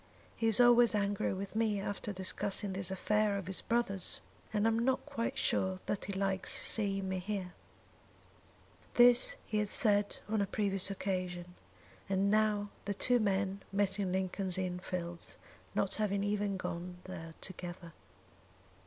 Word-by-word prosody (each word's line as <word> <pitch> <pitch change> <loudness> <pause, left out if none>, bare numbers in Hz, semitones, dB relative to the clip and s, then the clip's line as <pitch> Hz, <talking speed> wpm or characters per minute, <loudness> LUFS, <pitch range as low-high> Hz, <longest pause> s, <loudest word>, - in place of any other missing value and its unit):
"He 225 - 0
is 225 0 +3
always 240 -2 +6
angry 200 -1 0
with 195 +2 -5
me 220 -2 +1
after 205 +1 -4
discussing 195 +1 -2
this 185 -1 -3
affair 210 +2 +1
of 195 - -5
his 190 +1 -2
brother's; 230 -6 -1 0.3
and 210 0 +1
I - - +5
am 225 0 +1
not 260 +2 +1
quite 280 -6 -3
sure 190 0 +1
that 205 - -2
he 200 - -4
likes 190 -1 -1
seeing 195 -3 0
me 190 0 -2
here." 185 -1 -4 1.4
This 245 - +7
he 215 - -1
had 210 -1 0
said 205 -4 +4
on 215 0 0
a 200 - 0
previous 195 -2 +2
occasion, 185 -2 -3 0.6
and 195 +1 +2
now 210 -1 +2
the 200 0 -2
two 245 +4 +3
men 195 -2 0
met 200 0 0
in 190 -2 -1
Lincoln's 185 0 -1
Inn 180 -1 -2
Fields, 175 -2 -6 0.4
not - - +1
having 200 -2 0
even 205 -1 -1
gone 180 0 -5
there 165 -3 -8
together. 175 -2 -7
200 Hz, 155 wpm, -33 LUFS, 190-210 Hz, 1.4 s, This